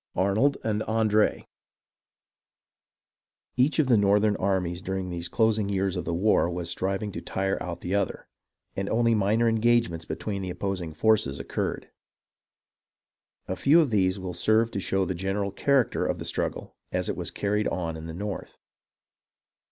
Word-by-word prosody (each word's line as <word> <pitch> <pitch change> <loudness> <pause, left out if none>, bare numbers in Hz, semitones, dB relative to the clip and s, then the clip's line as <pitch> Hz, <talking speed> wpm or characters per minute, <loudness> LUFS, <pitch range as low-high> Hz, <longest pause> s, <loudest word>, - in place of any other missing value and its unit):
ARNOLD 105 +10 +2
AND 110 -1 0
ANDRE 110 -1 +2 2.1
Each 130 +4 +2
of 155 - +4
the 125 -3 +4
northern 105 +1 +3
armies 90 -2 -1
during 95 -1 -3
these 85 0 -4
closing 110 -2 +1
years 95 -2 0
of - - -3
the 85 - -2
war 95 -1 +3
was 85 -1 -3
striving 95 +2 -2
to - - -6
tire 95 0 -2
out 85 -1 -5
the 90 - -3
other, 100 -2 -1 0.5
and 95 0 -2
only 115 +1 +3
minor 110 +2 +2
engagements 115 -7 +2
between 100 -2 -4
the 95 - -4
opposing 90 -2 -3
forces 80 -5 +1
occurred. - - -3 1.6
A 95 - -2
few 145 - +5
of 150 -7 +2
these 95 -2 +2
will 95 -2 -5
serve 110 +6 +2
to - - -3
show 95 0 0
the 95 - -2
general 95 +3 -2
character 135 +4 +1
of - - -1
the - - -6
struggle - - -3 0.2
as - - -1
it - - -1
was - - -3
carried 105 +1 -1
on 85 -3 -2
in 80 0 -7
the 80 - -6
north. 100 +2 -5
100 Hz, 160 wpm, -26 LUFS, 90-110 Hz, 2.1 s, few